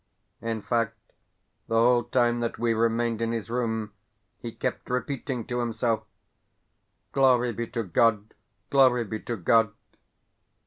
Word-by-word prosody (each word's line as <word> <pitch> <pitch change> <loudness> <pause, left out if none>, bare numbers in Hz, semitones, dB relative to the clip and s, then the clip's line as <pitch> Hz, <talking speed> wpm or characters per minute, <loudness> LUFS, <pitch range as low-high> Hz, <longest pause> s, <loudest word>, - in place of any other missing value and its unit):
In 115 -2 -3
fact, 115 -1 0 0.7
the 115 - -1
whole 120 +1 +4
time 120 -1 +2
that 115 -1 -2
we 115 -1 +1
remained 115 0 0
in 115 0 0
his 115 0 -4
room 110 -3 -2 0.5
he 120 - -6
kept - - -4
repeating 125 -1 -3
to 120 0 -3
himself: 115 -1 -1 1.1
"Glory 125 -3 +3
be 115 +2 -4
to 115 0 -3
God, 105 +2 +1 0.4
glory 130 -3 +5
be 110 0 -5
to 120 - -4
God!" 110 +4 +3
115 Hz, 135 wpm, -26 LUFS, 115-120 Hz, 1.1 s, glory